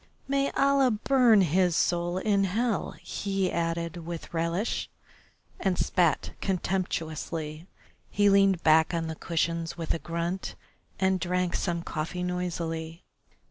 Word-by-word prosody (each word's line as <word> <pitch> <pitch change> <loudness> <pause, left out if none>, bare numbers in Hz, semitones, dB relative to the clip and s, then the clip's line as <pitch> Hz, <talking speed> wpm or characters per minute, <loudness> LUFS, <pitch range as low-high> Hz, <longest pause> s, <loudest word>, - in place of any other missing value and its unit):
May 275 0 +1
Allah 275 -1 +4
burn 235 -1 +4
his 180 0 +2
soul 175 +1 +1
in 200 0 +2
hell!" 220 +3 -1
he 195 -2 -1
added 170 0 -2
with 170 0 -7
relish, 170 +6 -1 0.7
and 190 -2 0
spat 175 -3 +1
contemptuously. 165 -4 -3 0.4
He 205 0 +2
leaned 195 -3 +4
back 160 +2 +4
on 165 -1 -1
the 160 0 -4
cushions 165 +1 -2
with 165 -2 -1
a 165 - -3
grunt, 170 +3 -3 0.4
and 190 0 +2
drank 180 -1 -1
some 170 -2 -1
coffee 170 +3 -4
noisily. 170 -2 -3
175 Hz, 125 wpm, -28 LUFS, 165-195 Hz, 0.7 s, Allah